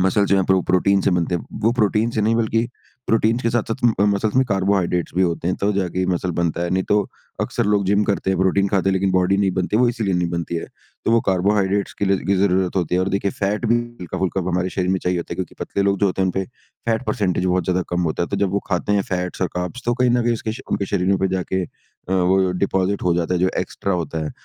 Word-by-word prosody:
Muscles 95 +2 +2
जो 100 - +4
हैं 95 - +2
pro 95 -1 +3
protein 95 +2 +3
से 95 - +1
बनते 90 0 0
हैं। 85 - -3 0.2
वो 115 - +3
प्रोटीन 110 0 +1
से 110 - -1
नहीं 110 +2 +2
बल्कि 115 +1 +1 0.4
प्रोटीन 115 +1 +2
के 115 -2 0
साथ-साथ 115 -1 -1 0.2
अ, - - +5
मसल्स 105 +2 +1
में 130 - +5
कार्बोहाइड्रेट्स 95 -3 0
भी 95 - +4
होते 85 0 0
हैं 90 - 0
तब 105 +1 +2
जाके 90 -2 -1
ये 90 - +1
मसल 90 0 -1
बनता 85 0 -1
है, 85 - -2
नहीं 95 0 +1
तो, 105 -1 +1 0.3
अक्सर - - -1
लोग 105 -1 +2
जिम 100 +2 +3
करते 95 -1 0
हैं, 95 - 0
प्रोटीन 100 +1 +2
खाते 95 -1 +1
हैं, 95 - +2
लेकिन 95 0 +1
बॉडी 95 +1 +3
नहीं 100 -1 +2
बनती 95 +3 0
है, 115 - +3
वो 125 - +4
इसीलिए 110 -6 -1
नहीं 90 -1 0
बनती 85 0 -3
है। - - -4 0.4
तो - - +1
वो 115 - +5
कार्बोहाइड्रेट्स 100 +1 +1
के 100 - +1
लिए 95 -1 +2
की 100 0 +2
ज़रूरत 95 -1 +1
होती 90 -2 0
है 90 - +2
और 95 - 0
देखिए, 100 0 0
फैट 105 +5 -2
भी 115 - +4 0.2
हल्का-फुल्का 95 +2 -2
हमारे 90 +1 0
शरीर 90 -1 -1
में 95 - +1
चाहिए 90 -1 0
होता 85 - -5
है - - -2
क्योंकि 95 -3 -5
पतले 100 - -1
लोग 100 -1 +1
जो 100 - +4
होते 95 0 0
हैं, - - +2
उनपे 95 +1 -1 0.4
फैट 115 +2 0
परसेंटेज 95 -7 0
बहुत 90 -1 +1
ज़्यादा 90 +1 0
कम 90 0 0
होता 85 - -2
है। - - -2
तो - - -2
जब 95 - -1
वो 100 - +2
खाते 95 +2 0
हैं 100 -1 +2
फैट्स 90 0 -2
और 90 - +1
कार्ब्स, 90 +8 -4
तो 120 - +2
कहीं 125 0 +2
ना 120 0 +2
कहीं 120 - +2
उसके 110 -1 -4
श - - -8
उनके 100 - 0
शरीरों 95 0 +1
पे 95 - +1
जाके 95 0 -1
अ, - - -9 0.5
वो 95 0 +3
डिपॉज़िट 95 +1 0
हो 90 -1 +2
जाता 85 +1 0
है, - - +1
जो 95 - +3
एक्स्ट्रा 100 - -2
होता 80 -3 -2
है। - - -4
95 Hz, 270 wpm, -21 LUFS, 90-100 Hz, 0.5 s, अ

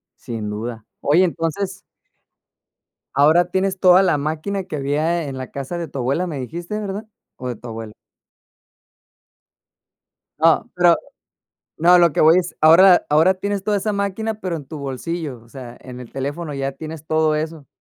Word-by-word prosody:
Sin 110 -3 -6
duda. 110 +1 -6 0.2
Oye, 165 +6 +4
entonces 180 +3 -2 1.3
ahora 155 +5 +5
tienes 190 +1 -1
toda 185 0 +6
la 175 -5 +2
máquina, 160 +7 -3
que 180 - -6
había 155 +4 0
en 135 -2 -6
la 130 - -7
casa 140 +5 -5
de 170 -2 -4
tu 135 - -7
abuela 140 +9 0
me 150 -5 -5
dijiste, 170 - -5
¿verdad? 205 +1 -5 0.3
¿O 125 - -7
de 125 - -3
tu 120 - -11
abuelo? 110 -1 -7 2.5
No, 165 +8 +3
pero 175 -1 +5 0.8
no 170 +3 +3
a 180 - +7
lo 170 -3 +4
que - - 0
voy 160 +3 +6
es 180 -1 -3
ahora 175 +4 +7
ahora 160 +6 +4
tienes 200 +1 -3
toda 210 0 +1
esa 210 +2 -1
máquina 200 +2 -2
pero, 185 -5 -4
en 150 - -8
tu 150 +3 -8
bolsillo, 140 -1 -5
o 115 - -20
sea 125 -2 -10
en 125 -1 -10
el 125 - -10
teléfono 145 +3 -4
ya 135 0 -2
tienes 155 +2 -8
todo 155 -1 +2
eso. 155 -1 -4
160 Hz, 170 wpm, -20 LUFS, 135-180 Hz, 2.5 s, a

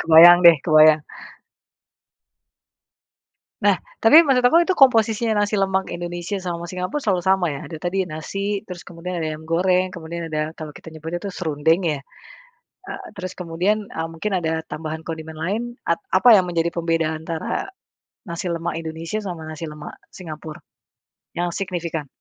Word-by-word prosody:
kebayang 165 +2 +9
deh 170 -2 +9
kebayang. 155 -1 +6 2.6
Nah - - +4 0.2
tapi 295 +8 +9
menurut 250 -2 +3
aku 285 +7 +5
itu 375 - +1
komposisinya 225 -4 +4
nasi 205 +1 +1
lemak 190 -1 0
Indonesia 175 +3 -5
sama 170 -1 -4
Singapura 185 - -3
selalu 195 -8 0
sama 190 -1 +2
ya - - -6
ada 160 - -8
tadi 190 +3 -1
nasi 195 +5 -4
terus 180 -1 -8
kemudian 175 +1 -7
ada 160 -2 -2
ayam 155 +1 -9
goreng 180 +2 +2
kemudian 170 0 -6
ada 155 0 -2
kalau 155 -2 -8
kita 160 - -11
nyebutnya 160 +2 -5
itu 200 - -4
serundeng 160 0 +1
ya? 150 -3 -1 0.8
Eee, 390 - -8
terus 185 -2 -5
kemudian, 185 +5 -1
eee, 165 0 -4
mungkin 200 +6 -4
ada 160 0 0
tambahan 155 +1 -6
kondimen 160 -1 -7
lain 200 +8 -1 0.3
at - - +3 0.2
apa 240 -3 +7
yang 190 - +5
menjadi 170 -1 -1
pembedaan 165 -2 -1
antara, 165 - -4 0.6
nasi 170 +1 -4
lemak 170 -1 -3
Indonesia 165 +6 -5
sama 170 -5 -6
nasi 155 +1 -7
lemak 150 0 -9 0.2
Singapura, 155 -3 -9 0.8
yang 175 0 -1
signifikan? 170 -5 -4
170 Hz, 155 wpm, -22 LUFS, 160-190 Hz, 2.6 s, kebayang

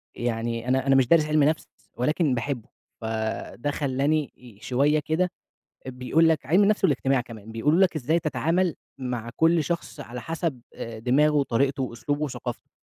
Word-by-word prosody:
يعني 115 0 -2
أنا 130 +1 +1
أنا 135 - +5
مش 130 -3 +4
دارس 165 0 +5
علْم 155 -1 +3
نفْس 155 +2 +1 0.3
ولكن 150 +1 +1
باحبه، 120 -1 -3 0.3
فده 110 +4 -3
خلّاني 145 +2 0
ي 120 -5 -16
شوية 140 +5 +2
كده، 165 +4 0 0.6
بيقول 130 +6 +2
لَك 160 -5 0
علْم 180 +9 +4
النفْس 210 +1 +2
والاجتماع 135 -2 +2
كمان، 110 -3 -11
بيقولوا 145 +9 +2
لَك 185 -4 +4
إزاي 155 +4 +1
تتعامل 165 +2 0 0.2
مع 120 -3 -4
كُل 165 -1 +3
شخص 170 -2 -4
على 125 -3 -7
حسب 165 -5 -3
آآ، 115 -1 -6
دماغه 140 +6 +3
وطريقته 135 0 +1
وأسلوبه 145 +4 -3
وثقافته. 125 -4 -5
135 Hz, 160 wpm, -25 LUFS, 120-155 Hz, 0.6 s, أنا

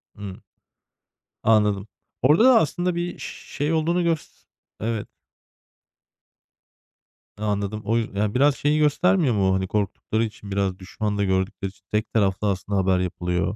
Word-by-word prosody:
Hı. 100 -2 -8 1.0
Anladım. 105 -2 +3 0.3
Orada 150 - +5
da 255 -3 +8
aslında 175 +4 0
bir 175 +1 -3
ş - - -6 0.3
şey 145 +3 0
olduğunu 170 +3 +1
gös 165 -2 -3 0.3
evet. 110 -1 -2 2.3
Anladım. 105 0 -2
O, 115 +2 +2
y 105 -2 -1
biraz 140 +2 +4
şeyi 150 +1 +1
göstermiyor 155 - +3
mu? 95 -1 +2
Hani, 95 0 0
korktukları 105 +2 -1
için, 105 -2 -6
biraz 95 -1 -1
düşman 105 +2 -3
da 100 - +1
gördükleri 95 +1 -1
için, 100 0 -22
tek 105 +1 -1
taraflı 100 -1 +1
aslında 100 +1 -2
haber 95 -1 +2
yapılıyor. 90 +2 -1
105 Hz, 135 wpm, -24 LUFS, 100-145 Hz, 2.3 s, da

